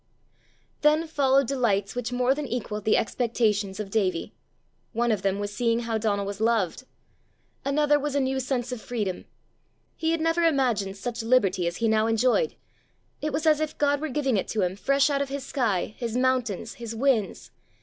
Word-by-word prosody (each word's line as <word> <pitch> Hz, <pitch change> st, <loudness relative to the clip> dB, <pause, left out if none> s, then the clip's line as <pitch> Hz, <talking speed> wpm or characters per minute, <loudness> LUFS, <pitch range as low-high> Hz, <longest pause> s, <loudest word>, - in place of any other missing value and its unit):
Then 305 Hz, +2 st, +4 dB
followed 275 Hz, -3 st, +2 dB
delights 220 Hz, -7 st, 0 dB
which 245 Hz, 0 st, -3 dB
more 250 Hz, +1 st, +2 dB
than 290 Hz, 0 st, -4 dB
equalled 210 Hz, -4 st, -4 dB
the 215 Hz, -, +4 dB
expectations 215 Hz, -4 st, 0 dB
of 200 Hz, -2 st, -5 dB
Davie. 185 Hz, -6 st, 0 dB, 0.6 s
One 240 Hz, +1 st, +1 dB
of 210 Hz, -4 st, 0 dB
them 195 Hz, 0 st, 0 dB
was 205 Hz, 0 st, -4 dB
seeing 230 Hz, +1 st, +1 dB
how 230 Hz, -2 st, -2 dB
Donal 205 Hz, -2 st, 0 dB
was 200 Hz, +1 st, -5 dB
loved. 225 Hz, 0 st, +1 dB, 0.8 s
Another 295 Hz, +1 st, +2 dB
was 290 Hz, 0 st, -3 dB
a -, -, +3 dB
new 265 Hz, 0 st, 0 dB
sense 255 Hz, -1 st, -2 dB
of 250 Hz, -3 st, -5 dB
freedom: 210 Hz, -7 st, -3 dB, 0.7 s
he 320 Hz, -, -1 dB
had 330 Hz, 0 st, +1 dB
never 330 Hz, +1 st, +1 dB
imagined 240 Hz, -11 st, +1 dB
such 235 Hz, +3 st, -4 dB
liberty 200 Hz, -7 st, +2 dB
as 170 Hz, -, -3 dB
he 230 Hz, -, +1 dB
now 220 Hz, 0 st, +3 dB
enjoyed. 250 Hz, -, +2 dB, 0.7 s
It 305 Hz, -, -1 dB
was 300 Hz, +3 st, -2 dB
as 305 Hz, -1 st, +4 dB
if 310 Hz, -1 st, -3 dB
God 285 Hz, 0 st, +2 dB
were 315 Hz, -, -2 dB
giving 270 Hz, -4 st, 0 dB
it 190 Hz, -, -1 dB
to 215 Hz, -3 st, 0 dB
him, 180 Hz, +1 st, -1 dB
fresh 275 Hz, +7 st, +2 dB
out 280 Hz, 0 st, +1 dB
of 280 Hz, -, -2 dB
his 275 Hz, -1 st, -4 dB
sky, 215 Hz, -8 st, -1 dB
his 235 Hz, -1 st, -2 dB
mountains, 255 Hz, -6 st, 0 dB
his 230 Hz, -1 st, -5 dB
winds. 235 Hz, -4 st, 0 dB
240 Hz, 190 wpm, -26 LUFS, 210-275 Hz, 0.8 s, Then